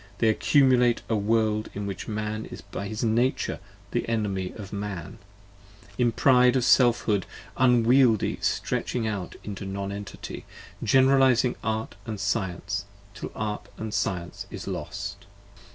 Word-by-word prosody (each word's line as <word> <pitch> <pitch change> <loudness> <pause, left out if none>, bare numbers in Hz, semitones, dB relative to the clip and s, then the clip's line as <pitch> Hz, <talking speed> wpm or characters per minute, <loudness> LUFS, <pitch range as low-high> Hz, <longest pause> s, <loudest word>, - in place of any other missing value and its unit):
they 110 - +3
accumulate 125 0 +4
A 110 - +2
World 110 0 +1
in 100 0 -3
which 100 -2 -5
Man 110 0 -3
is - - -9
by 100 - -6
his 110 +2 -4
Nature 120 +3 +1 0.3
the 120 - -1
Enemy 100 -5 -1
of 100 -2 -9
Man, 100 0 -5 0.8
In 120 +2 +2
pride 125 +1 +5
of 130 - +2
Selfhood 120 -6 +4 0.3
unwieldy 125 -2 +4
stretching 120 -3 -1
out 100 -5 -3
into 100 -2 -6
Non 100 0 -4
Entity, 100 0 -7 0.4
Generalizing 130 0 +4
Art 110 0 -2 0.2
& - - -3
Science 100 0 -2 0.3
till - - -7
Art 105 -1 -3
& 110 -1 -3
Science 90 -2 -2
is - - -7
lost. - - -5
110 Hz, 135 wpm, -26 LUFS, 100-120 Hz, 0.8 s, pride